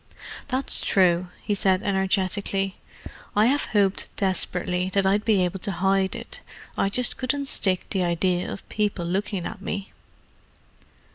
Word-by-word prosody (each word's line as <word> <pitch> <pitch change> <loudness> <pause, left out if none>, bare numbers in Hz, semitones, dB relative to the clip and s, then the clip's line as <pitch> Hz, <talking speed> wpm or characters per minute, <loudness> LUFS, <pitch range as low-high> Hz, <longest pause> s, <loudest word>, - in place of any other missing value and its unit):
"That's 260 0 +2
true," 180 -2 +3 0.2
he 210 - 0
said 190 -1 +2
energetically. 195 0 0 0.6
"I 210 +1 +5
have 280 +5 +2
hoped 200 -3 +1
desperately 180 -2 -1
that 195 -1 +3
I'd 200 +2 +2
be 210 -5 +3
able 180 +2 -3
to 200 - -2
hide 190 +2 +1
it; - - -9 0.3
I 195 - +1
just 250 +5 +1
couldn't 280 +2 -1
stick 190 -8 +1
the 190 - +1
idea 175 +1 0
of - - -8
people 205 -4 -1
looking 190 0 -2
at 210 -3 -6
me." 200 0 -4
195 Hz, 145 wpm, -25 LUFS, 185-205 Hz, 0.6 s, I